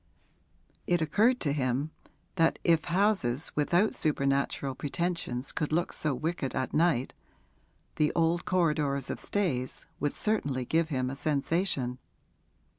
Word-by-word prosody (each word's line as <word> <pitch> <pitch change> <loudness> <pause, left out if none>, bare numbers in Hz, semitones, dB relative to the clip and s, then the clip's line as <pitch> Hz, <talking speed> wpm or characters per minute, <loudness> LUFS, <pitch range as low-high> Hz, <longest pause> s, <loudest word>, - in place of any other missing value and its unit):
It 175 0 +3
occurred 215 +11 +3
to 145 -3 +1
him 135 +2 -1 0.4
that 165 -2 +3
if 165 -2 +3
houses 170 - +1
without 175 +8 +2
supernatural 140 -2 0
pretensions 145 -3 -3
could 150 - -2
look 170 +2 0
so 150 -3 0
wicked 155 0 -3
at 130 - -2
night, 155 -6 +2 0.8
the 150 -1 +3
old 170 +1 +2
corridors 150 -6 +1
of - - -5
Stayes 140 -11 -2
would 145 - 0
certainly 140 - -1
give 160 +4 +1
him 130 -3 -1
a - - -5
sensation. 140 -3 0
155 Hz, 125 wpm, -29 LUFS, 135-170 Hz, 0.8 s, It